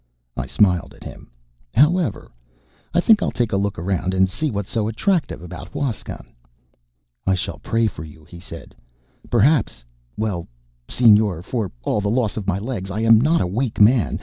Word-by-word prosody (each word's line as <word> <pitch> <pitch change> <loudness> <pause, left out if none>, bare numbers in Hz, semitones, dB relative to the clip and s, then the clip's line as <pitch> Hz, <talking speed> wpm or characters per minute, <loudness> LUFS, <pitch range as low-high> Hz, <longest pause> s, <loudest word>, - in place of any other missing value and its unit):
I - - -4
smiled 90 -6 +1
at - - -15
him. - - -11 0.5
"However, 160 +5 +2 0.6
I 175 - +2
think 215 +2 +5
I'll - - +1
take 120 -2 -1
a - - 0
look 100 0 -1
around 90 +1 -1
and 95 0 +4
see 155 +11 -2
what's 100 -5 -4
so 110 -2 0
attractive 160 - -1
about 90 0 -8
Huascan." 135 -7 -4 1.0
"I 95 - +3
shall 90 - -4
pray 115 0 0
for 95 -7 -4
you," 80 0 -13
he 85 +3 -12
said. 85 -2 -10 0.6
"Perhaps 120 - +2 0.3
well, 100 -6 -2 0.4
Señor, 105 -7 +4
for 105 -1 -3
all 105 - 0
the 100 - -1
loss 115 -2 0
of 105 -3 -5
my 95 -1 +1
legs, 100 -3 -5
I 105 +3 -3
am 115 0 +6
not 160 +5 +3
a - - +1
weak 115 +6 -2
man. 110 +2 +4
105 Hz, 175 wpm, -21 LUFS, 95-125 Hz, 1.0 s, am